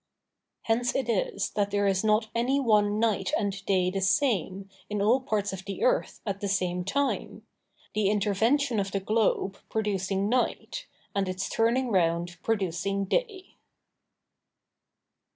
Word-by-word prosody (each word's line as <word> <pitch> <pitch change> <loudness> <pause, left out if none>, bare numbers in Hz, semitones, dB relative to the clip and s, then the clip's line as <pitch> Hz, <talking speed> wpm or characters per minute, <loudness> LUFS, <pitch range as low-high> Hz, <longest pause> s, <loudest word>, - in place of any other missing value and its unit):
Hence 240 +2 +1
it 265 -3 0
is 225 -5 -1
that 205 -1 0
there 205 0 +1
is 195 0 +1
not 215 +1 +2
any 250 +4 +1
one 210 -5 +3
night 215 -4 +1
and 200 -1 -2
day 185 -2 +2
the 195 0 -2
same, 195 - +1 0.2
in 210 0 -2
all 220 +6 +4
parts 205 -5 -1
of 190 -1 -6
the 200 - -4
earth, - - +1
at 200 -2 -3
the 200 - -1
same 180 -2 0
time; 280 +9 -2 0.5
the 210 -2 +2
intervention 220 +5 +2
of 195 -1 -2
the 200 - +1
globe 200 -1 0
producing 200 -2 -1
night, 255 - -1 0.3
and 195 -2 0
its 185 +1 -3
turning 235 +2 +1
round 175 -1 +1
producing 195 -1 -1
day. 405 - -2
205 Hz, 145 wpm, -28 LUFS, 195-230 Hz, 0.5 s, all